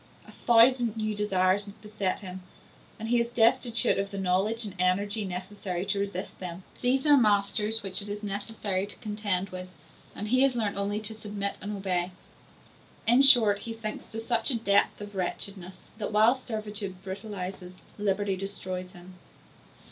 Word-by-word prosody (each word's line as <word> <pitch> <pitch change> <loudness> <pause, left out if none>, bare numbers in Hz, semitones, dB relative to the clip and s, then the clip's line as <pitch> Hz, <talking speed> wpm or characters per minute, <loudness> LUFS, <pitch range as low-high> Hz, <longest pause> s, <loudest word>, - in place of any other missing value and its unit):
A - - -12
thousand 235 -1 +4
new 215 -1 -1
desires 195 -1 +2
beset 210 -2 -4
him, 185 -1 -8 0.6
and 225 0 -6
he 240 0 +3
is 235 - +1
destitute 235 -1 +3
of 200 0 -2
the 200 - -7
knowledge 195 +5 +1
and 200 - -6
energy 200 +4 +1
necessary 185 0 -5
to 200 0 -1
resist 200 -2 -5
them: 180 0 -7 0.2
these 260 +3 +1
are 295 -1 +7
masters 215 -1 +1
which 195 +1 -1
it 205 - -7
is 205 +1 -6
necessary 200 -1 -3
to - - -10
contend 205 -3 -2
with, 185 0 -8 0.5
and 210 +1 -5
he 255 +2 +3
has 270 -2 +4
learnt 215 -4 -1
only 200 +1 -1
to 215 +1 -5
submit 205 -2 -4
and 205 +1 -5
obey. 185 -2 -1 0.9
In 240 +3 +5
short, 230 -7 +8
he 230 - -6
sinks 225 -1 -5
to 225 - -7
such 230 +1 +1
a 260 - +3
depth 200 -3 +2
of 205 0 -8
wretchedness, 185 0 -4
that 210 - -3
while 215 +3 +5
servitude 210 -6 -6
brutalizes, 190 -2 -7 0.2
liberty 205 -1 0
destroys 185 -1 -5
him. 180 +1 -14
205 Hz, 165 wpm, -28 LUFS, 190-225 Hz, 0.9 s, short